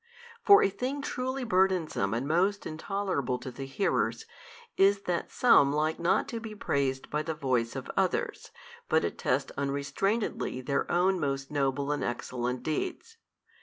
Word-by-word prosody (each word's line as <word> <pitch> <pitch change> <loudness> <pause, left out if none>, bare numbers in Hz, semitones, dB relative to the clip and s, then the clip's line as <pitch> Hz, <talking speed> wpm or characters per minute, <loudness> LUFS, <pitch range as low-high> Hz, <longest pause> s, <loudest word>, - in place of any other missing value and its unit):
For 405 0 +8
a - - +3
thing 270 +7 -3
truly 260 -1 -3
burdensome 185 - +1
and 125 +4 -2
most 185 +6 +1
intolerable 160 -6 -2
to 130 - -7
the 135 +2 -7
hearers, 160 +9 0 0.5
is 200 +1 +5
it 200 - -24
that 175 -2 -2
some 145 - +5
like 155 +2 0
not 170 +3 +2
to 230 - -4
be 220 -1 -8
praised 135 -8 -1
by 150 - 0
the 160 0 -3
voice 130 -6 0
of - - -5
others, - - -1 0.4
but - - +3
attest - - -1
unrestrainedly 140 - -1
their 140 +2 -1
own 185 +2 +2
most 135 -2 -2
noble 140 0 0
and 150 - -1
excellent 125 +1 -3
deeds. 375 - -3
155 Hz, 155 wpm, -29 LUFS, 135-200 Hz, 0.5 s, For